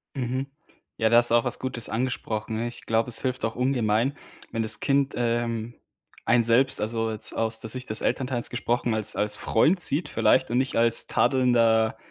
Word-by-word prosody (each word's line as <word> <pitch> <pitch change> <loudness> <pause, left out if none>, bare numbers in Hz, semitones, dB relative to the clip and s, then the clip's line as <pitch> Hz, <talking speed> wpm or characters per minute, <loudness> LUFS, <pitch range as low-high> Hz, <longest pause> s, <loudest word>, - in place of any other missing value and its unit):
Mhm, 130 +1 -4 0.5
ja, 110 -1 +1
da 115 - +4
hast 120 0 +4
du 120 - +4
auch 120 - +2
was - - -3
Gutes 125 -3 -3
angesprochen. 115 -2 -4
Ich 120 - -11
glaube, 115 +2 -1
es 115 - 0
hilft 130 -3 -3
auch 115 - -4
ungemein, 125 +1 -1 0.3
wenn 115 -1 -3
das 110 - +1
Kind, 140 0 0
ähm, 115 -1 -3 0.5
einen 120 0 +2
selbst, 125 +4 +3
also 115 +1 -2
jetzt 110 - -3
aus 110 0 0
der 110 - -4
Sicht 130 +3 -1
des 110 - +2
Elternteils 125 -1 -1
gesprochen, 120 -1 -2
als 110 -2 +4
als 105 0 0
Freund 160 +11 +1
sieht 150 -1 +4
vielleicht 130 -2 +1
und 120 - 0
nicht 130 +1 -2
als 115 0 +4
tadelnder, 115 -4 +1
120 Hz, 190 wpm, -24 LUFS, 115-130 Hz, 0.5 s, da